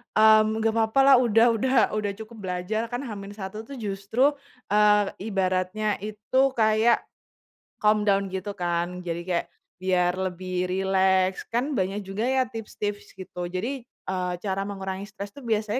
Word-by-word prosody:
mmm, 215 0 +6
nggak 225 0 +1
papalah 270 +5 +5
udah 230 -2 +4
udah 260 +4 0 0.2
udah 205 -1 -1
cukup 220 +1 -10
belajar. 180 +4 -2
Kan 245 +3 -3
H-1 200 -3 -7
tuh 280 - -8
justru, 220 +5 +1 0.4
eee, 210 -1 +4 0.2
ibaratnya 190 +1 0
itu 210 +5 -4 0.2
kayak 220 +1 +3 0.8
calm 210 0 +3
down 200 -1 +2
gitu 190 +2 -4
kan. 175 +1 -1
Jadi 170 -1 -4
kayak 175 -1 0 0.3
biar 180 -1 +2
lebih 185 0 -2
rileks, 190 0 +1
kan 245 +6 -1
banyak 200 -3 -1
juga 195 +5 -3
ya 260 0 +3
tips-tips 205 -2 -5
gitu. 180 -2 -6
Jadi, 185 +7 -3 0.2
eee, 180 -1 -4
cara 195 -1 -1
mengurangi 195 0 -5
stress 205 -1 -8
itu - - -12
biasanya 220 -2 -1
205 Hz, 145 wpm, -25 LUFS, 185-220 Hz, 0.8 s, mmm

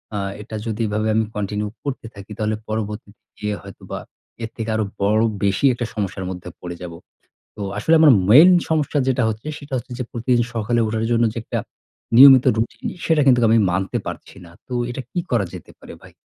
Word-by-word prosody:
আ - - -1 0.2
এটা 110 +1 -8
যদি 110 +1 -3
এভাবে 110 +1 -1
আমি 110 - +2
কন্টিনিউ 105 0 -2 0.2
করতে 140 -5 -5
থাকি 100 +2 -11
তাহলে 110 0 -1
পরবর্তী 105 -1 -4 0.3
দিনে 105 -1 -3
হয়তোবা 100 -1 -8 0.4
এর 115 - -4
থেকে 115 0 -4
আরো 110 -1 0 0.2
বড় 105 +2 +3 0.2
বেশি 100 +7 +1
একটা 120 0 -3
সমস্যার 100 -2 -3
মধ্যে 90 -1 -7
পড়ে 90 0 -6
যাব। 85 -1 -7 0.6
তো 105 - -6 0.2
আসলে 160 +10 +3
আমার 155 -4 +8 0.2
মেইন 155 +10 +9 0.2
সমস্যা 150 -2 +1
যেটা 130 -1 +1
হচ্ছে, 110 +7 -5
সেটা 140 -2 -8
হচ্ছে 125 +1 -6
যে 125 - -2
প্রতিদিন 120 +1 +1
সকালে 115 +1 0
উঠার 110 +1 -1
জন্য 115 0 +3
যে - - -18
একটা - - -3 0.6
নিয়মিত 130 0 +9
রুটিন 110 - -3 0.2
সেটা 160 -2 +3
কিন্তু 125 -2 +5
আমি 115 - +5
মানতে 95 +1 -1
পারছি - - -8
না। - - -15 0.2
তো - - -8 0.2
এটা 120 - -5
কি 175 - -2
করা 115 -5 +2
যেতে - - -11
পারে - - -11
ভাই? - - -15
110 Hz, 195 wpm, -21 LUFS, 105-125 Hz, 0.6 s, মেইন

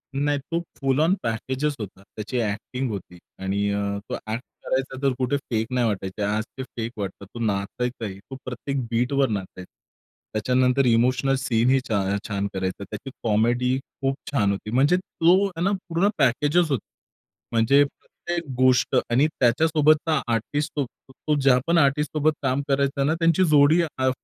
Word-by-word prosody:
नाही 145 +1 +1
तो 170 - +1 0.2
फुल 135 +1 +1
आँन 165 +4 +4
पॅकेजच 130 +6 -1
होता. 100 -2 -7
त्याची 105 +5 -6
एक्टिंग 120 +4 -2
होती 95 -3 -7 0.3
आणि 100 +1 0
अ, 100 0 -1 0.3
तो - - -2
एक्ट 110 +4 -5 0.2
करायचा, 130 0 -2
तर 135 -2 +2
कुठे 130 +2 0
फेक 115 -5 -2
नाही 120 -2 +2
वाटायचे. 95 -1 -3
आज 105 +2 0
ते 130 - -3
फेक 115 -3 -5
वाटतात. 100 0 -5
तो - - -5
नाचायचा 115 +3 -2
आहे, 95 -1 -6
तो 135 +6 -10
प्रत्येक 130 +2 -3
बीटवर 130 +4 +2
नाचायचा. 95 -3 -5 0.6
त्याच्यानंतर 125 +4 +2
इमोशनल 125 +3 +3
सीन 120 -2 +1
ही 135 - +4
छा 100 -3 0
छान 100 -1 -1
करायचा. 95 +1 -3
त्याची 105 +7 -7
कॉमेडी 120 +4 +2 0.2
खूप 135 0 +1 0.2
छान 105 -8 +2
होती. 100 +2 -4
म्हणजे 145 +8 +4
तो 185 +1 +3
हे 170 -3 -7
ना 195 - +2 0.2
पूर्ण 170 +5 +2
पॅकेजच 150 +5 +3
होता. 125 - -1 0.7
म्हणजे 120 +5 +5
प्रत्येक 170 +2 -6
गोष्ट 130 0 +3
आणि 130 +6 +4
त्याच्यासोबतचा 155 +4 +3
आर्टिस्ट 145 +7 -1
तो 140 +2 -3
ज्यापण 135 +5 +3
आर्टिस्टसोबत 150 +1 +2
काम 130 +1 +1
करायचा 140 0 +1
ना, 150 +3 +2
त्यांची 165 +2 +3
जोडी 150 +3 +6 0.2
आ 130 0 +2
130 Hz, 160 wpm, -24 LUFS, 110-145 Hz, 0.7 s, जोडी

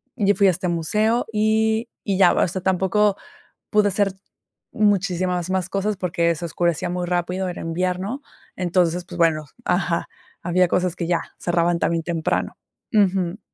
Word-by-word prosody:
Yo 205 -4 +2
fui 200 - +3
a - - +6
este 180 +1 -3
museo, 210 +8 +1
y 220 +1 +2 0.2
y 195 -3 -1
ya, 195 - +6
o - - +2
sea, 185 +2 -4
tampoco 190 +2 +2 0.5
pude 210 -1 +4
hacer 200 0 +1 0.6
muchísimas 185 -4 +1
más 190 -1 -1
cosas, 200 +1 -1
porque 170 -2 0
se 170 +2 -5
oscurecía 170 0 -1
muy 180 0 -2
rápido, 180 +2 -1
era 180 - -6
invierno, 180 - -2 0.3
entonces, 180 -1 +1
pues, 175 - -9
bueno. 160 -3 +2 0.2
Ajá, 180 -1 0 0.4
había 180 +1 +3
cosas 180 0 0
que 170 - -3
ya 175 -1 +2 0.2
cerraban 170 0 +1
también 165 -1 0
temprano. 165 -1 -2 0.4
Ujú. 190 -2 +2
180 Hz, 155 wpm, -22 LUFS, 175-200 Hz, 0.6 s, a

